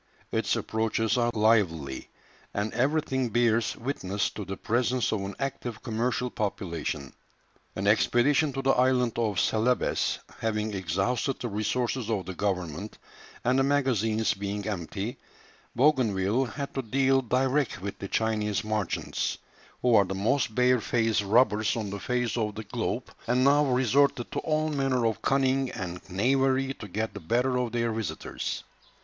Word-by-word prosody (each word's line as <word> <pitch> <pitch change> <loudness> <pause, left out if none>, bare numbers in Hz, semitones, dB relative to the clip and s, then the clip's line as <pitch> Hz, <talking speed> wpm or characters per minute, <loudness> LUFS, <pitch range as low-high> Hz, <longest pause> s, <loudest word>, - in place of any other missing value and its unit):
Its - - +1
approaches 110 0 0
are 120 -1 +2
lively, 95 -11 +1 0.5
and 105 +2 -1
everything 130 -1 +1
bears 115 0 +2
witness 105 -6 -2
to 105 - -6
the 95 0 -6
presence 125 +2 0
of 105 - -1
an 100 0 -5
active 125 -4 -4
commercial 120 +1 -1
population. 85 -9 -3 0.6
An 95 - -3
expedition 135 +8 +3
to 135 0 -3
the 135 - +4
island 125 -2 +2
of 105 -5 +1
Celebes 115 +3 +1 0.2
having 110 -1 -1
exhausted 100 - -1
the 120 - -3
resources 115 +3 -1
of 105 -4 -1
the 95 - -5
government 90 0 -3 0.5
and 130 +2 +3
the - - +4
magazines 115 -6 +1
being 100 +1 -4
empty, 100 +3 -4 0.6
Bougainville 120 -4 +2
had 140 +4 -5
to 135 - -1
deal 135 +2 +2
direct 130 +3 +1
with 100 +2 -6
the 100 - -5
Chinese 105 -1 0
merchants, 105 -4 -2 0.5
who 125 -1 +4
are 100 -3 +6
the 95 +1 -4
most 110 +3 0
bare 125 -1 +4
faced 115 -2 +1
robbers 110 +1 +3
on 105 -3 -3
the 100 - -4
face 125 +2 -1
of 105 -3 -1
the 110 - -5
globe, 115 +3 -3
and 125 +2 +3
now 145 +2 +5
resorted 130 0 +2
to - - -1
all 155 0 0
manner 135 -4 +1
of 110 -1 0
cunning 135 -1 +2
and 90 -6 -5
knavery 135 +6 +2
to 105 - -9
get 110 +3 -3
the - - -6
better 125 +9 +1
of 125 -2 -1
their 115 0 0
visitors. 110 -2 -4
115 Hz, 155 wpm, -28 LUFS, 105-130 Hz, 0.6 s, are